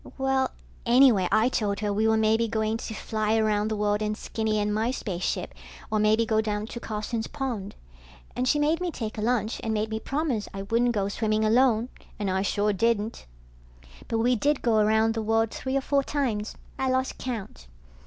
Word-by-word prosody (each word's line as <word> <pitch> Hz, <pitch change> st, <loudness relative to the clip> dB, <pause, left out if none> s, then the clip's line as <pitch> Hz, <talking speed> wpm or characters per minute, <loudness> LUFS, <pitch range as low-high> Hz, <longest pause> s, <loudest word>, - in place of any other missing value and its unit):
Well... 265 Hz, -1 st, +1 dB, 0.3 s
anyway 240 Hz, -6 st, +5 dB
I 220 Hz, +2 st, +4 dB
told 205 Hz, -4 st, -1 dB
her 205 Hz, -1 st, 0 dB
we 215 Hz, +2 st, +2 dB
were 220 Hz, 0 st, +3 dB
maybe 220 Hz, +1 st, +2 dB
going 220 Hz, 0 st, -1 dB
to 225 Hz, -, -6 dB
fly 215 Hz, 0 st, -1 dB
around 215 Hz, -1 st, +1 dB
the 220 Hz, -, -1 dB
world 210 Hz, 0 st, 0 dB
in 215 Hz, 0 st, -1 dB
Skinny 220 Hz, -1 st, -2 dB
and 210 Hz, 0 st, 0 dB
my 220 Hz, +3 st, 0 dB
spaceship, 185 Hz, -, -3 dB, 0.4 s
or 215 Hz, -, +2 dB
maybe 215 Hz, +2 st, +3 dB
go 220 Hz, -1 st, +2 dB
down 210 Hz, -1 st, -2 dB
to 235 Hz, -, -7 dB
Carson's 220 Hz, 0 st, -3 dB
pond. 245 Hz, -9 st, -4 dB, 0.6 s
And 255 Hz, -, 0 dB
she 295 Hz, -, +3 dB
made 305 Hz, +3 st, +1 dB
me 360 Hz, -, -1 dB
take 220 Hz, -8 st, -5 dB
a -, -, -2 dB
lunch 225 Hz, -1 st, 0 dB
and 220 Hz, -1 st, -1 dB
made 215 Hz, +1 st, -1 dB
me 220 Hz, -, -2 dB
promise 275 Hz, -5 st, -2 dB
I 195 Hz, -, -4 dB
wouldn't 235 Hz, +4 st, +1 dB
go 200 Hz, -1 st, 0 dB
swimming 215 Hz, +1 st, 0 dB
alone, 235 Hz, +1 st, +3 dB, 0.3 s
and 205 Hz, -2 st, -1 dB
I 190 Hz, +1 st, +1 dB
sure 205 Hz, +1 st, +1 dB
didn't. 220 Hz, -, 0 dB, 0.8 s
But 225 Hz, -, -1 dB
we 245 Hz, +2 st, +3 dB
did 290 Hz, +5 st, 0 dB
go 225 Hz, -3 st, +3 dB
around 220 Hz, +1 st, +3 dB
the 225 Hz, -, -2 dB
world 225 Hz, +1 st, +1 dB
three 265 Hz, +1 st, -2 dB
or -, -, 0 dB
four 280 Hz, +1 st, +1 dB
times. 245 Hz, -7 st, -2 dB, 0.2 s
I 265 Hz, 0 st, +1 dB
lost 260 Hz, 0 st, -1 dB
count. 215 Hz, -, -6 dB
220 Hz, 200 wpm, -26 LUFS, 210-245 Hz, 0.8 s, anyway